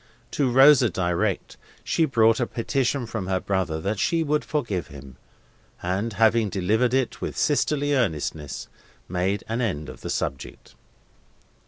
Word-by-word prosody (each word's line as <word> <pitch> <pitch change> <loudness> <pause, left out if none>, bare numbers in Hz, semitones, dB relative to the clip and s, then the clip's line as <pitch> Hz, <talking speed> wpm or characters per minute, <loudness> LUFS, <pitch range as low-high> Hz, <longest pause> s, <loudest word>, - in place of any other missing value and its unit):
To 140 -3 +1
Rosa 135 -1 +6
direct, 90 -3 -1 0.3
she 165 - +1
brought 115 -5 +3
a 120 - 0
petition 130 +2 -1
from 110 -5 -5
her 95 -1 0
brother 95 -5 -1
that 100 +3 -2
she 165 - +1
would 150 0 0
forgive 110 - -2
him; 70 -2 -12 0.7
and, 95 +6 -1
having 110 +1 +3
delivered 110 +7 +1
it 130 -2 -1
with - - -4
sisterly 145 -1 +1
earnestness, 80 - -2 0.4
made 95 +3 -1
an 115 +2 -2
end 80 -10 -2
of - - -11
the - - -6
subject. 65 -2 -4
110 Hz, 145 wpm, -24 LUFS, 90-130 Hz, 0.7 s, Rosa